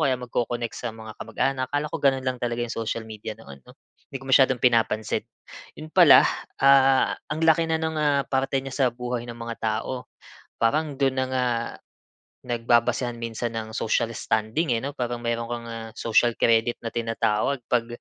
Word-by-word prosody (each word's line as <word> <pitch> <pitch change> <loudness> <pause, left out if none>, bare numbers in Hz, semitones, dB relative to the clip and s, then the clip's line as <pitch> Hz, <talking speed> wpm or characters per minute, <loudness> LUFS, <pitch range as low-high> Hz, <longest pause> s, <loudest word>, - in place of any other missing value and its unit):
kaya 130 -2 +2
magko-connect 120 -1 -3
sa 120 - -4
mga 110 -1 -9
kamag-anak 130 -1 -1
akala 145 +1 -2
ko - - -1
gano'n 135 -1 +2
lang 130 -1 -2
talaga 120 0 -1
'yong 120 - -5
social 115 0 -3
media 110 0 -7
noon 70 -11 -13
'no. - - -15 0.3
'Di - - -6
ko 135 - -10
masyadong 130 -1 +4
pinapansin. 115 -3 +1 0.5
'Yon 155 0 -10
pala, 175 -7 +8 0.3
ah, 135 -1 +5 0.2
ang 150 +1 -3
laki 160 0 +4
na 160 - +2
ng 160 0 -2
ah, 145 -2 +2
parte 135 0 -1
niya 135 - -6
sa 140 - +1
buhay 120 0 -5
ng 120 - -7
mga 115 0 -6
tao, 110 +3 -3 0.5
parang 145 +4 0
do'n 135 -1 +2
na 130 0 +1
nga 130 -1 +1 1.0
nagbabasehan 120 0 0
minsan 115 0 -3
ng 110 -1 -4
social 110 +1 0
standing 115 +5 -1
eh, 115 - -2
'no, 140 - -3
parang 120 -1 -3
meron 115 0 -1
kang 120 0 -5
ah, 115 -1 -7
social 115 +1 +2
credit 115 +1 +2
na 115 - -4
tinatawag 115 +2 -1
'pag 120 -2 +2
120 Hz, 180 wpm, -25 LUFS, 115-135 Hz, 1.0 s, pala